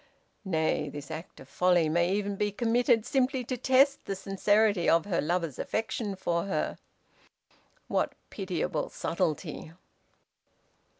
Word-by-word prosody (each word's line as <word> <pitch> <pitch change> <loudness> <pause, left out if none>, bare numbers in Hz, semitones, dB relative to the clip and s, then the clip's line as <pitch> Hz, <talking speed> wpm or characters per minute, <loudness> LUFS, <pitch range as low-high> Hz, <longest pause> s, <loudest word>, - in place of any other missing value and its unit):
Nay, 160 -4 0
this 145 +1 -8
act 160 +2 -8
of 135 - -12
folly 180 +1 +3
may 170 +3 +2
even 200 0 -1
be 205 +1 0
committed 235 +1 +2
simply 260 0 +1
to 255 +2 -3
test 265 +3 +3
the 195 - -3
sincerity 200 0 +2
of 165 0 +4
her 190 -4 0
lover's 165 -3 -1
affection 220 -2 -2
for 170 -2 -1
her. 195 - -2 1.1
What - - 0 0.2
pitiable 180 -5 -2
subtlety! 165 -2 -3
190 Hz, 125 wpm, -29 LUFS, 170-220 Hz, 1.1 s, of